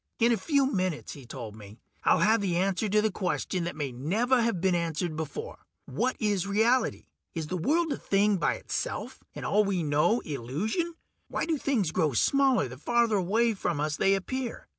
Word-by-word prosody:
"In 235 0 +4
a - - +4
few 280 +3 +2
minutes," 185 -5 -2
he 135 -4 -12
told 115 -5 -7
me, 105 0 -12 0.3
"I'll - - +4
have 220 +1 +4
the 180 -4 0
answer 195 +3 0
to 210 +2 +3
a 215 - +2
question 180 -1 -2
that 170 - -4
may 145 -3 -3
never 215 - +1
have 230 -6 0
been 190 +1 +2
answered 170 -1 -1
before: 300 - -5 0.3
what 255 +1 -1
is 205 -4 0
reality? 225 +4 +2 0.3
Is 160 -2 -2
the 185 - -2
world 320 - +1
a - - -4
thing 200 0 +2
by - - +1
itself, - - -4
and - - -6
all 210 +1 +3
we 195 -4 -1
know 150 +10 +2
illusion? 165 - -3 0.3
Why - - -2
do 325 - 0
things 250 - 0
grow 160 -6 +1
smaller 265 - +3
the 130 +1 -9
farther 235 +3 +2
away 220 +5 +2
from 175 -6 -2
us 150 0 -1
they 195 +5 +3
appear? 245 +5 -4
195 Hz, 195 wpm, -28 LUFS, 160-235 Hz, 0.3 s, In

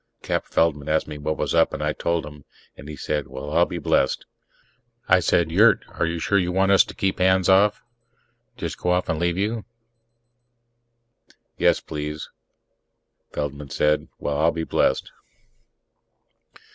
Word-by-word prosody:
Cap - - -1
Feldman 75 -3 0
asked 80 0 +1
me 75 -1 -7
what 75 +1 -2
was - - -1
up, 80 -1 +3
and 75 - -4
I 75 0 0
told 85 -2 -1
him, 75 -1 -11 0.3
and 70 - -11
he 75 - -6
said, 75 +1 -3
"Well, 65 +3 -7
I'll 85 +2 +4
be 90 - -5
blessed!" 70 -4 +1 0.8
I - - +5
said, 85 -2 +1
"Yurt, 105 +3 +5
are 85 - -2
you 85 +1 -2
sure 100 +5 +1
you 90 -1 -1
want 95 +2 +2
us 100 - +7
to - - -11
keep 95 -1 -1
hands 95 0 +3
off... 100 +2 +4 0.7
just - - -5
go 90 - -1
off 90 0 +1
and 80 - -1
leave 85 0 0
you?" 110 +3 -1 2.0
"Yes, - - +3
please." 75 0 -6 1.0
Feldman 75 0 -5
said, 75 +2 +1
"Well, 75 0 -2
I'll 80 +2 +4
be 80 - -4
blessed." - - 0
80 Hz, 160 wpm, -23 LUFS, 75-90 Hz, 2.0 s, us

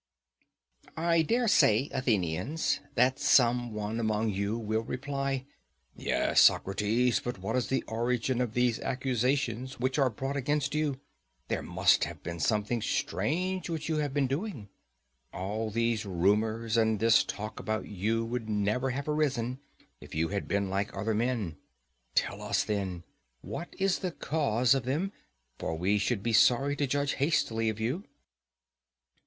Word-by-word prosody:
I 165 0 +3
dare 235 +9 +1
say, 130 - +4
Athenians, 110 - 0 0.2
that 125 +2 +3
some 120 -1 +4
one 105 +1 -3
among 110 -1 0
you 100 +3 -1
will 110 -1 -1
reply, 135 +2 -3 0.5
"Yes, - - +2
Socrates, 110 +6 +3
but 120 -2 -3
what 100 +5 -3
is 125 -4 0
the 130 -2 0
origin 120 +2 -1
of 120 -3 -2
these 125 -2 +2
accusations 130 0 -1
which 130 +3 0
are 135 -2 +4
brought 135 +5 -4
against 145 +1 0
you; 150 -3 0 0.5
there - - -1
must - - +3
have - - -9
been 85 0 -5
something 105 +5 0
strange 175 - -1
which 160 -1 -3
you 160 - +1
have 145 -2 -1
been 140 0 +1
doing? 135 - -4 0.6
All 105 +4 -3
these 115 0 0
rumours 110 +5 +1
and 110 -2 +2
this 115 +1 +5
talk 105 +1 -6
about 110 0 -2
you 110 +4 -1
would 115 -1 -4
never 105 +5 0
have 140 +3 -3
arisen 135 -5 0 0.4
if - - -11
you 80 +1 +1
had 100 0 -3
been 100 0 0
like 100 +2 -1
other 110 +3 0
men: 110 - -1 0.6
tell - - 0
us, - - +1
then, 95 -5 -3 0.4
what 175 - -6
is 195 -1 +1
the 185 - -2
cause 130 -7 +1
of 135 -3 0
them, 155 +10 -1 0.5
for 80 - -3
we 100 +5 +1
should 100 0 -1
be 115 0 0
sorry 135 +5 +4
to 145 - 0
judge 140 +1 0
hastily 115 -7 +1
of 110 0 -4
you." 130 - -1
120 Hz, 155 wpm, -29 LUFS, 105-135 Hz, 0.6 s, this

